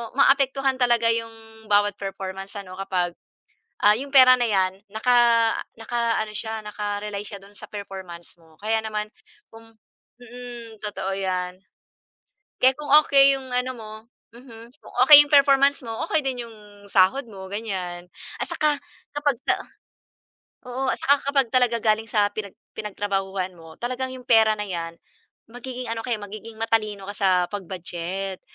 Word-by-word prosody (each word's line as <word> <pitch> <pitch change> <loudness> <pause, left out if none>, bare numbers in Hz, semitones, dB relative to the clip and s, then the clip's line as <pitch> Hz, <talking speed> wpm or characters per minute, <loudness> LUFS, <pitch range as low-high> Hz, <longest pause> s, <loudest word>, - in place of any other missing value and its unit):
maapektuhan 270 -1 +3
talaga 240 -2 +3
'yong 225 -1 -7
bawat 205 0 +3
performance 195 0 -6
ano 190 -2 -8
kapag, 185 -2 -1 0.7
ah, 210 0 +7
'yong 275 +4 -6
pera 255 -1 +9
na 245 - -2
'yan 190 -2 +1
naka 230 +3 +2 0.6
naka-ano 230 -2 -1
siya 220 0 -4
naka-rely 205 -1 -4
siya 200 -1 -8
do'n 200 +1 -17
sa - - -8
performance 190 -4 -9
mo 160 -1 -22
kaya 220 +2 0
naman 215 -1 -3 0.5
kung 225 0 -14 0.5
mm, 240 -2 -10
totoo 205 -2 -4
'yan. 185 -1 -3 1.0
Kaya 260 +1 +6
kung 300 -1 -6
okey 275 0 +6
yung 260 -1 -11
ano 250 +1 -1
mo, 220 -3 -10 0.4
mhm, 230 -2 -13
kung - - -15
okay 290 +2 +11
yung 290 - -14
performance 280 0 +5
mo 225 - -5 0.2
okey - - +2
din 255 -3 -3
yung 225 - -14 0.3
sahod 195 +9 +4
mo 190 -3 -10
ganyan, 185 -5 -5 0.3
at - - 0
saka 300 -1 +1 0.4
kapag 290 -3 +1
sa - - +4 1.1
oo, 260 +2 -2
at - - -12
saka 285 - +5 0.2
kapag 275 -2 +3
talaga 245 -2 +3
galing 220 0 +2
sa 210 -2 +2
pinag 205 -2 -6 0.2
pinagtrabahuhan 195 -2 -3
mo 165 -1 -13
talagang 255 +2 -3
yung 255 -1 -11
pera 220 -2 +5
na 210 - -2
yan, 170 -3 -5 0.6
magiging 250 +1 -7
ano 225 0 -3
kaya 240 -2 0
magiging 215 +2 -9
matalino 215 -3 0
ka - - -7
sa 195 - +2 0.2
pag-budget, 190 0 -5
220 Hz, 150 wpm, -24 LUFS, 195-250 Hz, 1.1 s, okay